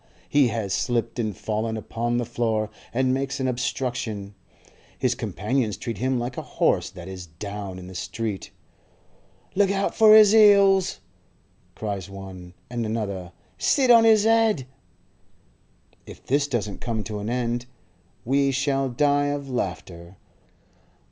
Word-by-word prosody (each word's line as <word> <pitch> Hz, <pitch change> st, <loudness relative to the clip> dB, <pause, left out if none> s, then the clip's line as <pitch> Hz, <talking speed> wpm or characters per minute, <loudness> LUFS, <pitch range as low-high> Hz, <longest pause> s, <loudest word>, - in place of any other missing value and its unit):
He 145 Hz, -3 st, +4 dB
has 110 Hz, -4 st, -2 dB
slipped 120 Hz, -1 st, -1 dB
and 110 Hz, -3 st, -2 dB
fallen 110 Hz, +1 st, -2 dB
upon 120 Hz, +2 st, -2 dB
the 120 Hz, -, -1 dB
floor, 110 Hz, -2 st, -1 dB, 0.2 s
and 130 Hz, +1 st, +1 dB
makes 135 Hz, +1 st, -2 dB
an 130 Hz, -, 0 dB
obstruction; 120 Hz, -5 st, -3 dB, 0.6 s
his -, -, +1 dB
companions 105 Hz, 0 st, -2 dB
treat 115 Hz, -2 st, -5 dB
him 130 Hz, +1 st, 0 dB
like 120 Hz, +1 st, -4 dB
a -, -, -2 dB, 0.2 s
horse -, -, +2 dB
that 90 Hz, 0 st, -11 dB
is 95 Hz, -2 st, -8 dB
'down' 100 Hz, +3 st, -7 dB
in 90 Hz, -, -9 dB
the 95 Hz, -, -10 dB
street. 105 Hz, +2 st, -4 dB, 1.0 s
'Look 200 Hz, 0 st, +3 dB
out 195 Hz, 0 st, 0 dB
for 215 Hz, -1 st, +7 dB
his 215 Hz, -1 st, +8 dB
'eels!' 200 Hz, -, +5 dB, 0.7 s
cries 100 Hz, -3 st, -4 dB
one; 95 Hz, -2 st, -10 dB
and 120 Hz, -1 st, -3 dB
another, 100 Hz, -5 st, -3 dB, 0.3 s
'Sit 260 Hz, -3 st, +3 dB
on 230 Hz, -1 st, +8 dB
his 220 Hz, -2 st, +5 dB
'ed!' 225 Hz, -, +3 dB, 1.4 s
If -, -, -12 dB
this 140 Hz, +2 st, +1 dB
doesn't 110 Hz, -7 st, -3 dB
come 115 Hz, -3 st, -2 dB
to 105 Hz, -1 st, -5 dB
an 105 Hz, +2 st, -4 dB
end 120 Hz, 0 st, -2 dB, 0.6 s
we 140 Hz, +3 st, +2 dB
shall 135 Hz, 0 st, 0 dB
die 145 Hz, +3 st, +2 dB
of 145 Hz, -1 st, -3 dB
laughter. 90 Hz, -5 st, -5 dB
120 Hz, 140 wpm, -24 LUFS, 105-140 Hz, 1.4 s, his